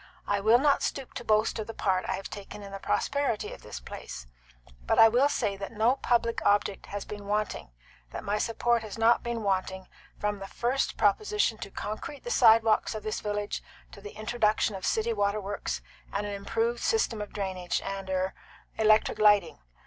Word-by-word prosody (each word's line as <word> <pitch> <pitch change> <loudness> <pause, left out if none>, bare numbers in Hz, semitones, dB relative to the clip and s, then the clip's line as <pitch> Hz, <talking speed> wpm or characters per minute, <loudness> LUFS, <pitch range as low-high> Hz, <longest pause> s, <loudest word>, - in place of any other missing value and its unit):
I 205 - +1
will 220 +4 +5
not 280 +2 +3
stoop 270 -2 -3
to - - -6
boast 215 0 +2
of 215 - -4
the 225 - -7
part 185 -2 0
I - - +1
have 195 - -5
taken 205 0 -9
in 200 - -9
the 195 - -6
prosperity 275 0 -1
of - - -12
this - - -7
place; - - -8 0.6
but - - +2
I 225 - +9
will 250 +6 +3
say 210 -8 0
that 195 0 -6
no 230 +5 +2
public 235 -2 +1
object 205 -1 +1
has 205 0 -5
been 205 -1 -8
wanting 210 - -2 0.4
that - - -7
my 205 +1 -1
support 235 +1 +1
has 215 -1 -7
not 225 +1 +4
been 235 -2 -3
wanting 190 -1 -1 0.3
from 210 -1 -2
the 195 - -7
first 245 +6 -1
proposition 420 - +2
to - - -6
concrete 215 +9 -6
the 485 - -4
sidewalks 225 - +5
of 215 - -5
this 215 0 -2
village 205 0 -3 0.3
to 200 - -12
the 205 0 -10
introduction 215 -1 +1
of 190 -1 -4
city 225 +1 +1
waterworks 200 - -2 0.3
and 205 +1 -2
an 205 - -4
improved 225 +4 -1
system 345 - +1
of 205 - -6
drainage, 185 -3 -2
and 195 -1 -5
er 190 0 0 0.5
electric 215 0 +4
lighting. 205 -5 +4
210 Hz, 190 wpm, -28 LUFS, 200-230 Hz, 0.6 s, I